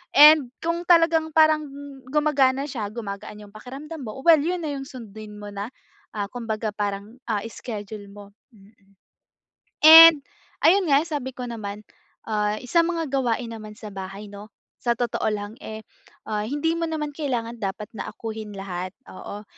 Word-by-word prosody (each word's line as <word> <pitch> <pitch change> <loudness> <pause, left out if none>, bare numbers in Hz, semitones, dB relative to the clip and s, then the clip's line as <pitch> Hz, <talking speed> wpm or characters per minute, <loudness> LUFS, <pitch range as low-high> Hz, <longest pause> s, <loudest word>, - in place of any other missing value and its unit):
And 295 -3 +8
kung 335 +1 -1
talagang 330 -2 +4
parang 310 -1 +4 0.4
gumagana 280 -2 +2
siya 225 -6 -4
gumagaan 210 -2 -7
'yung 200 - -18
pakiramdam 275 +8 -9
mo. 215 +4 -7
Well, 330 -2 +7
'yun 350 +3 -1
na 295 - -2
'yung 270 -1 -5
sundin 215 -3 -10
mo 205 - -7
na, 200 +2 -5 0.4
ah, 205 -2 -3
kumbaga 225 -2 -3
parang, 205 +2 -4
ah, 210 -2 0
schedule 210 -3 -8
mo, 205 -1 -12 0.2
mm. 205 0 -20 1.1
And 325 +1 +12 0.5
ayun 370 0 +5
nga, 280 0 +5
sabi 280 -5 -4
ko 250 0 -6
naman, 210 -3 -6 0.5
ah, 210 -1 0
i - - -11
sa 340 - +5
mga 335 -2 -2
gawain 245 -3 0
naman 215 -1 -9
sa 215 -1 -10
bahay 195 +2 -7
'no, 205 +1 -11 0.3
sa 240 - +2
totoo 240 -2 -1
lang, 205 +1 -5
eh, 220 0 -6 0.5
ah, 210 -1 -1
hindi 295 +7 0
mo 335 - -2
naman 300 -2 -3
kailangan 240 -6 -2
dapat 200 +1 -4
na 215 - -5
akuhin 220 -1 -7
lahat, 185 -2 -5 0.2
oo. 205 +1 -8
230 Hz, 160 wpm, -24 LUFS, 210-300 Hz, 1.1 s, And